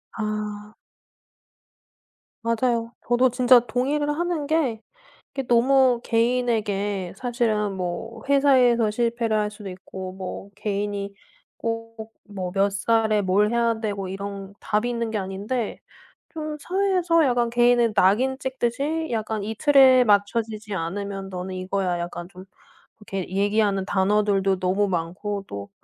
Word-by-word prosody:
아. 210 -1 -4 1.7
맞아요. 230 0 0
저도 245 +2 +4
진짜 250 0 +6
동의를 265 +6 -1
하는 330 -1 -1
게 275 -9 0 0.5
이게 270 -2 -4
너무 250 0 +4
개인에게 215 -5 0
사실은 225 -4 0
뭐 180 +6 -5
회사에서 255 -5 +4
실패를 230 -1 0
할 210 0 0
수도 210 -2 -9
있고, 185 0 -8
뭐 190 +1 -7
개인이 200 -1 -3 0.4
꼭 230 -1 -5 0.2
뭐 185 -3 -4
몇 200 +1 +2
살에 215 +1 +1
뭘 200 +3 +2
해야 235 -1 +1
되고 200 -3 -3
이런 195 0 -6
답이 215 +3 0
있는 235 -2 -2
게 220 - -3
아닌데, 200 +5 -3 0.5
좀 310 -2 -5
사회에서 360 -2 +2
약간 240 -2 +1
개인의 240 -1 +3
낙인 250 +9 +3
찍듯이 270 +5 -2
약간 220 -2 -2
"이 220 +1 -4
틀에 265 -2 +6
맞춰지지 215 +1 0
않으면 195 +3 -4
너는 185 0 -5
이거야." 185 -1 -1
약간 175 0 -5
좀 185 0 -12 0.5
이렇게 195 -3 -5
얘기하는 200 -1 +1
단어들도 195 -1 +1
너무 190 +2 +1
많고 190 +4 -3
또 100 0 -7
220 Hz, 260 characters per minute, -24 LUFS, 195-245 Hz, 1.7 s, 진짜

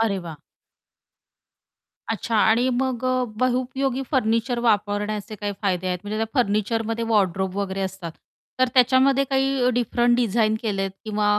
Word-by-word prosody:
अरे 210 -4 +1
वाह! 160 -3 -8 1.7
अच्छा. 225 +1 -3
आणि 230 +4 +3
मग 255 0 -1
अ, 255 0 +1
बहुउपयोगी 255 +2 0
फर्निचर 235 -2 +1
वापरण्याचे 210 -1 -1
काही 205 0 -4
फायदे 185 -2 0
आहेत, 180 -1 -1
म्हणजे 205 +1 -4
त्या 225 - 0
फर्निचरमध्ये 225 0 0
वॉर्डरोब 195 -3 0
वगैरे 195 -1 -2
असतात, 190 -3 -5 0.5
तर 255 - +4
त्याच्यामध्ये 260 +2 +4
काही 270 -1 +2
डिफरंट 240 0 +1
डिझाइन 220 -2 +2
केलेत 195 -3 -1
किंवा 210 -1 +1
225 Hz, 130 wpm, -23 LUFS, 205-250 Hz, 1.7 s, तर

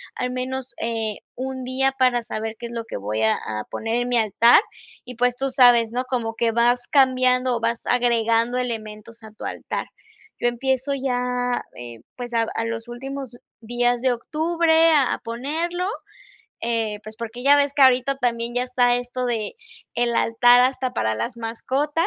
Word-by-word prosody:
al 250 - -2
menos, 255 0 -4
eh, 225 -2 -2 0.2
1, 260 0 -5
día 265 +1 +1
para 250 -2 +3
saber 220 0 -5
qué 235 - -6
es - - -11
lo 230 -1 -5
que - - -7
voy 105 +2 -2
a 110 - +4
a 105 0 -5
poner 225 +1 -3
en - - -4
mi 245 - +2
altar 230 - +5 0.4
y, 250 0 -9
pues, 245 +1 +1
tú 270 +2 -2
sabes, 245 -3 +5
¿no?, 250 +2 -2
como 235 -3 -3
que 230 0 +1
vas 240 +1 +2
cambiando 255 -2 +3
o - - -5
vas 230 0 -2
agregando 235 0 +2
elementos 225 -2 -5
a 220 - -11
tu 215 - -12
altar. - - -4 0.5
Yo - - +1
empiezo 265 +3 -1
ya, 250 -2 -1
eh, 120 -2 -9
pues, 245 -1 -7
a 230 -1 +2
a 225 - -1
los 230 0 -4
últimos 265 +1 -7 0.3
días 240 +1 0
de 260 0 +2
octubre 325 +5 +2
a 285 -5 +3
a - - -2
ponerlo, 315 +10 -3 0.7
eh, 225 -3 -1
pues, 215 0 -10
porque 230 +1 -7
ya 285 +2 +6
ves 285 -1 +2
que 285 - +3
ahorita 260 +1 +4
también 235 -2 -1
ya 245 - +1
está 250 -1 +2
esto 245 +1 -4
de 230 - -3 0.4
el 240 0 +1
altar 245 +2 +5
hasta 255 0 0
para 110 - 0
las 235 - -4
mascotas, 270 +8 -1
245 Hz, 180 wpm, -22 LUFS, 230-260 Hz, 0.7 s, ya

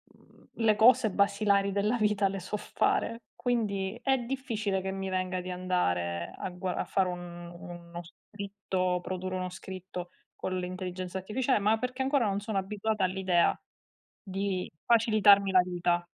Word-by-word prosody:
mhmm, - - -23
le 225 -2 +3
cose 220 +1 +6
basilari 200 0 +2
della 205 +4 +1
vita 210 -2 +2
le 195 -1 -4
so 210 +4 -3
fare, 230 +2 0
quindi 210 -4 -1
è 265 0 +3
difficile 230 -6 -2
che 190 0 -3
mi 195 0 -4
venga 185 -1 -1
di 180 +1 -6
andare 90 - -1
a - - -4
gua 180 0 -3
a - - -1
fare 190 -1 +1
un 175 -1 -6
uno 175 0 -9
scritto, 190 0 -3
produrre 185 +1 -4
uno 185 0 -3
scritto 185 -1 -7 0.3
con 185 0 -3
l'intelligenza 185 0 -4
artificiale, 225 +5 +1
ma 215 +2 +3
perché 255 +2 -3
ancora 265 -2 +2
non 200 +1 -1
sono 215 -1 -3
abituata 205 +1 0
all'idea 185 -2 +2 0.6
di 195 -2 -3
facilitarmi 210 -4 +5
la 185 -1 +7
vita. 175 -1 0
190 Hz, 150 wpm, -29 LUFS, 180-210 Hz, 0.6 s, la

